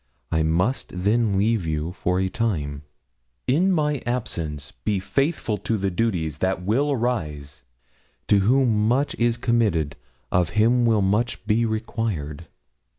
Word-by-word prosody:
I 80 Hz, -, +2 dB
must 90 Hz, +11 st, 0 dB
then 105 Hz, +2 st, +1 dB
leave 110 Hz, 0 st, +2 dB
you 80 Hz, +1 st, -2 dB
for 90 Hz, 0 st, -1 dB
a 95 Hz, -, +1 dB
time; 80 Hz, -10 st, -2 dB, 0.6 s
in 175 Hz, +9 st, +3 dB
my 150 Hz, -5 st, +1 dB
absence 80 Hz, -, -3 dB
be 105 Hz, -3 st, -2 dB
faithful 135 Hz, -, -1 dB
to 110 Hz, +3 st, -1 dB
the 95 Hz, -1 st, -1 dB
duties 85 Hz, -8 st, -1 dB
that 95 Hz, -1 st, 0 dB
will 130 Hz, +10 st, +1 dB
arise. 75 Hz, -, -3 dB, 0.7 s
To 100 Hz, -, +5 dB
whom 110 Hz, 0 st, +3 dB
much 135 Hz, +5 st, +1 dB
is 120 Hz, 0 st, +2 dB
committed, 105 Hz, -, +1 dB, 0.4 s
of 90 Hz, -2 st, +2 dB
him 120 Hz, +2 st, +4 dB
will 110 Hz, -3 st, +3 dB
much 105 Hz, +5 st, 0 dB
be 115 Hz, +2 st, +2 dB
required. 110 Hz, -9 st, -3 dB
105 Hz, 140 wpm, -24 LUFS, 85-120 Hz, 0.7 s, To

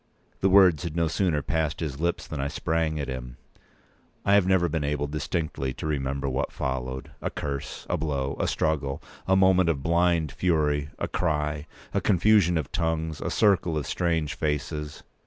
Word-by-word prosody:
The 95 Hz, -, +3 dB
words 95 Hz, -6 st, +6 dB
had 85 Hz, -2 st, -4 dB
no 85 Hz, -1 st, +2 dB
sooner 80 Hz, -3 st, 0 dB
passed 80 Hz, +1 st, -1 dB
his 75 Hz, -4 st, -4 dB
lips 85 Hz, +1 st, -1 dB
than 75 Hz, -3 st, -4 dB
I 70 Hz, -, -1 dB
sprang 80 Hz, +1 st, -1 dB
at 70 Hz, -, -3 dB
him. 65 Hz, -1 st, -6 dB, 0.9 s
I 100 Hz, -, +4 dB
have 100 Hz, -2 st, +5 dB
never 95 Hz, -2 st, +3 dB
been 80 Hz, -2 st, -2 dB
able 75 Hz, 0 st, -1 dB
distinctly 75 Hz, -2 st, -3 dB
to -, -, -6 dB
remember 70 Hz, -2 st, -1 dB
what 65 Hz, -1 st, -1 dB
followed. 65 Hz, 0 st, -4 dB
A -, -, -1 dB
curse—a 70 Hz, -2 st, -4 dB
blow—a 70 Hz, -3 st, -1 dB
struggle—a 75 Hz, +4 st, -1 dB
moment 95 Hz, -2 st, +4 dB
of 70 Hz, -5 st, -1 dB
blind 85 Hz, -2 st, +2 dB
fury—a 75 Hz, -4 st, 0 dB
cry—a 75 Hz, -3 st, -2 dB
confusion 100 Hz, -3 st, +4 dB
of 80 Hz, -, -3 dB
tongues—a 80 Hz, -2 st, -1 dB
circle 95 Hz, -6 st, +2 dB
of 75 Hz, -, -2 dB
strange 80 Hz, -4 st, 0 dB
faces. 75 Hz, 0 st, -3 dB
80 Hz, 155 wpm, -26 LUFS, 70-85 Hz, 0.9 s, words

